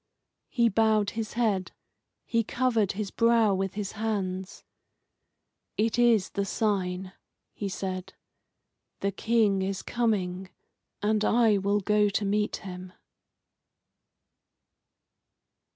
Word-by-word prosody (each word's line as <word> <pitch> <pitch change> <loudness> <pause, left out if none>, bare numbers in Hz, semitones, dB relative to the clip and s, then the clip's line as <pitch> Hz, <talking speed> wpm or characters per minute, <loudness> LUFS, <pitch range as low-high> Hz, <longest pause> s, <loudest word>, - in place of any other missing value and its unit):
He 235 -3 +3
bowed 215 -1 +2
his 225 -1 -4
head. 210 -6 0 0.5
He 230 -1 +1
covered 230 -3 +1
his 200 0 -4
brow 230 -3 +3
with 195 0 -2
his 205 -2 -3
hands. 195 -4 -3 1.1
"It 225 +2 +1
is 230 -5 +4
the 200 - -1
sign," 190 -3 -1 0.4
he 200 - -4
said. 185 -1 -5 0.9
"The 200 - 0
King 210 -1 +2
is 190 0 -3
coming, 190 -6 -1 0.5
and 215 0 +2
I 220 -2 +4
will 200 +1 +1
go 210 +1 +3
to 205 +1 -1
meet 210 +1 0
him." 180 -1 -8
205 Hz, 105 wpm, -27 LUFS, 190-225 Hz, 1.1 s, is